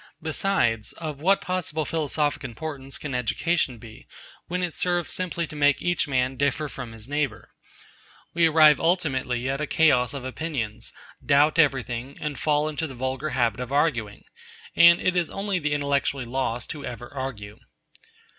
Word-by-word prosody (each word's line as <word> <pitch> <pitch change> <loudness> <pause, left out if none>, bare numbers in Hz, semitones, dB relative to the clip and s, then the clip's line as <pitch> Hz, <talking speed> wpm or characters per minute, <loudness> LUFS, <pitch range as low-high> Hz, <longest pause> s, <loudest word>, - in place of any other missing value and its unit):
Besides, 155 - 0
of 150 -3 -6
what 195 +4 +3
possible 175 -4 -2
philosophic 150 -2 -1
importance 135 +2 -6
can 145 -3 -6
education 125 +2 0
be, 115 +2 -13 0.4
when 180 +1 -2
it 175 -3 -2
serves 175 -1 0
simply 175 -2 -2
to 150 - -10
make 145 -1 +3
each 175 -3 0
man 130 -1 0
differ 140 +2 0
from 125 -4 -7
his 115 0 -10
neighbour? 145 0 -2 0.8
We 170 0 +4
arrive 155 -2 +6
ultimately 130 -8 0
at 135 +2 -1
a 150 - -1
chaos 135 -6 +3
of 135 -2 -6
opinions, 130 -6 -4 0.3
doubt 150 +3 +4
everything, 130 -3 +1
and 150 -2 -4
fall 150 0 +2
into 155 +1 -2
the 135 - -9
vulgar 130 +4 -2
habit 120 -4 0
of 125 0 -5
arguing; 120 -8 0 0.5
and 170 0 +8
it 185 - +1
is 175 -2 +1
only 195 -1 -2
the 150 -2 -1
intellectually 140 -2 0
lost 120 -1 -2
who 145 - -7
ever 120 +2 -7
argue. 115 -7 -6
145 Hz, 160 wpm, -25 LUFS, 125-160 Hz, 0.8 s, and